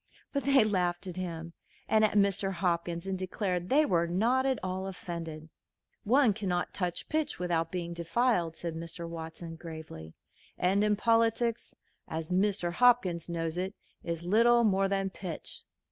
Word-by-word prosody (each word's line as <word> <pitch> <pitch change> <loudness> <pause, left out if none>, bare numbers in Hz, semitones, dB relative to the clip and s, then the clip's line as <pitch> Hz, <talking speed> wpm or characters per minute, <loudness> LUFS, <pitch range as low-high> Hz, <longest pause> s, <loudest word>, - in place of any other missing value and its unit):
But 280 -2 -1
they 275 -3 +6
laughed 180 -4 0
at 180 -2 -6
him 170 -2 -5 0.3
and 220 0 +4
at 215 - +3
Mr. 200 -1 +2
Hopkins, 170 -1 -1
and 190 -1 -2
declared 185 -1 -2
they 300 +3 +5
were 170 -7 +2
not 235 +10 +2
at 265 -2 +1
all 185 +1 -3
offended. 165 -4 -6 0.6
"One 250 0 +5
cannot 185 -4 -2
touch 180 -3 -3
pitch 310 -1 -1
without 165 -2 -1
being 170 -2 -3
defiled," 170 0 +1
said 170 -1 -4
Mr. 165 +1 -6
Watson, 165 0 -7
gravely, 160 - -9 0.4
"and 200 +3 +2
politics, 230 +1 +1 0.3
as 160 +1 -5
Mr. 185 -1 +1
Hopkins 190 -8 +3
knows 165 0 -2
it, 190 +2 -3 0.3
is 170 0 -3
little 235 +6 +4
more 195 -2 +3
than 195 -1 -1
pitch." 180 -4 -7
185 Hz, 150 wpm, -30 LUFS, 170-210 Hz, 0.6 s, they